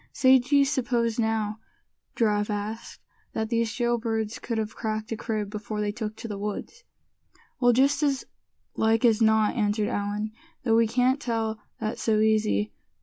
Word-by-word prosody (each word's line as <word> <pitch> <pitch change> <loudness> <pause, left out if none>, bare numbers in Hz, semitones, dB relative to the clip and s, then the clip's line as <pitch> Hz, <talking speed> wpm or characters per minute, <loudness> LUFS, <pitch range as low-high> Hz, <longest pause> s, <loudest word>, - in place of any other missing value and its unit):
"Say, 260 0 +6
d'ye 280 +3 +3
suppose, 245 -5 0
now," 220 -1 0 0.6
Giraffe 210 -2 +1
asked, 210 +2 -4 0.3
"that 220 0 -2
these 230 -1 +1
jail 240 0 0
birds 225 -1 -2
could 230 -2 -3
have 215 -1 -3
cracked 215 0 -3
a - - 0
crib 215 -2 -3
before 210 0 -5
they 210 0 0
took 215 0 -5
to 230 - -7
the 205 -2 -5
woods?" 210 - -5 0.8
"Well, 245 -1 +5
just 275 +4 +3
as 280 -3 +1 0.5
like 225 +2 +2
as 230 -1 +4
not," 220 -1 +4
answered 210 -2 +1
Allan; 205 +1 -2 0.3
"though 225 -3 +3
we 230 0 +4
can't 250 +4 +2
tell 225 -3 -2 0.2
that 215 +2 -3
so 215 -2 +2
easy. 110 - +2
220 Hz, 165 wpm, -26 LUFS, 215-240 Hz, 0.8 s, Say